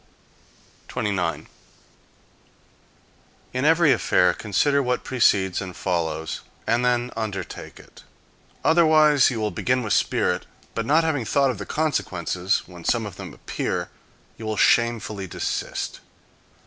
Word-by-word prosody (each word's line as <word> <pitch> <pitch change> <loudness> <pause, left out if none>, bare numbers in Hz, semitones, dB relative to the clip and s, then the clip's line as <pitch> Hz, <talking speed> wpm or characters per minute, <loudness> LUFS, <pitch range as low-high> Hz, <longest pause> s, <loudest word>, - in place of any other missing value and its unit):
29. 95 -4 -2 2.1
In 130 +2 -1
every 160 -1 +5
affair 90 -7 +3
consider 140 +8 +1
what 125 -2 -1
precedes 100 -8 +2
and 95 -2 -7
follows, 80 -3 -2 0.2
and 120 +2 +1
then 125 0 +1
undertake 110 -3 -5
it. - - -16 0.6
Otherwise 155 -3 +5
you 120 -3 -3
will 105 -1 -1
begin 125 +8 0
with 110 - 0
spirit; - - +1 0.3
but 115 0 -3
not 155 +3 +4
having 150 -6 0
thought 135 +4 +2
of 110 - -7
the 100 - -6
consequences, 95 - -1
when 90 -2 -12
some 115 +3 +1
of 105 - -7
them - - -8
appear - - -3 0.5
you 110 - -7
will 110 -1 -2
shamefully 110 -5 +2
desist. - - -3
115 Hz, 125 wpm, -24 LUFS, 95-140 Hz, 2.1 s, every